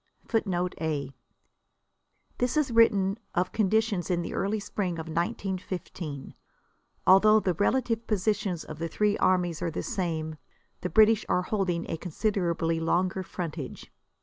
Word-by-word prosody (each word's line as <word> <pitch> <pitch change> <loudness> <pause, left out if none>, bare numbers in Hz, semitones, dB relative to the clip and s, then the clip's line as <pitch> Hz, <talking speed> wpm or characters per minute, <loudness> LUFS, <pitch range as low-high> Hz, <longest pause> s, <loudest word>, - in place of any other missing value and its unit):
[A] - - -27
[Footnote 180 -6 0
A: 145 -4 -2 1.3
This 245 +4 +1
is 290 -4 +2
written 210 -3 +4 0.2
of 180 +1 +1
conditions 215 -3 +1
in 175 -1 +1
the - - -5
early 210 +2 0
spring 200 -2 -2
of 160 -1 -5
1915. 170 -3 -4 0.7
Although 215 +3 +7
the 185 -4 0
relative 230 +4 0
positions 205 -4 0
of 155 0 -9
the 165 - -2
three 205 +5 +1
armies 180 -3 +2
are 175 - 0
the 160 - -4
same, 160 -7 -2 0.4
the 180 - -2
British 220 +1 +5
are 180 - +2
holding 180 -4 -1
a - - -3
considerably 170 -2 -1
longer 180 +3 +1
frontage. 165 -7 -6
185 Hz, 140 wpm, -28 LUFS, 170-210 Hz, 1.3 s, Although